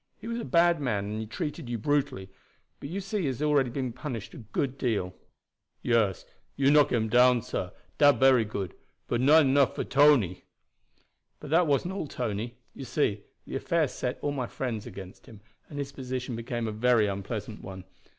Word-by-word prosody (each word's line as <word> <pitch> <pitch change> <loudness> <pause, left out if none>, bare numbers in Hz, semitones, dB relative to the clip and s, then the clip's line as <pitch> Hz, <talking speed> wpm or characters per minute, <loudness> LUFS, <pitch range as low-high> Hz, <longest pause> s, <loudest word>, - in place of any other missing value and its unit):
He - - -10
was 235 0 -3
a - - -4
bad 170 -2 +3
man, 105 -7 -1
and 110 - -3
he 110 - -5
treated 150 +1 -5
you 120 - -2
brutally, 115 -7 -1 0.5
but 140 - -7
you 190 +5 -3
see 200 +2 -3
he 180 - -1
has 130 -3 -2
been 150 - 0
already 135 -3 +1
punished 125 -3 -6
a - - -9
good 125 +4 -3
deal." 105 -9 -1 0.7
"Yes, 110 -6 +1 0.3
you 140 0 +3
knock 150 -1 +5
him 110 -2 +1
down, 125 +1 +4
sah. 95 -7 -3 0.3
Dat 145 -1 +7
bery 130 -3 +5
good, 100 -4 -5 0.3
but 120 - 0
not 150 +4 +6
enough 135 0 +3
for - - -2
Tony." 135 - +4 1.0
"But 150 - -9
that 170 +1 +4
wasn't 145 +6 +1
all, 195 -6 -4
Tony. 120 -1 -4 0.2
You - - -8
see, 105 -7 0 0.2
the - - -6
affair 165 +2 +1
set 125 -1 -4
all 145 - 0
my 130 -4 -3
friends 115 -5 -4
against 95 -1 -10
him, 110 -3 -13 0.3
and 145 - -8
his 140 -1 -4
position 130 -2 -5
became 115 0 -3
a - - -2
very 115 0 +3
unpleasant 105 +2 -4
one. 95 -1 -8
125 Hz, 190 wpm, -28 LUFS, 110-145 Hz, 1.0 s, Dat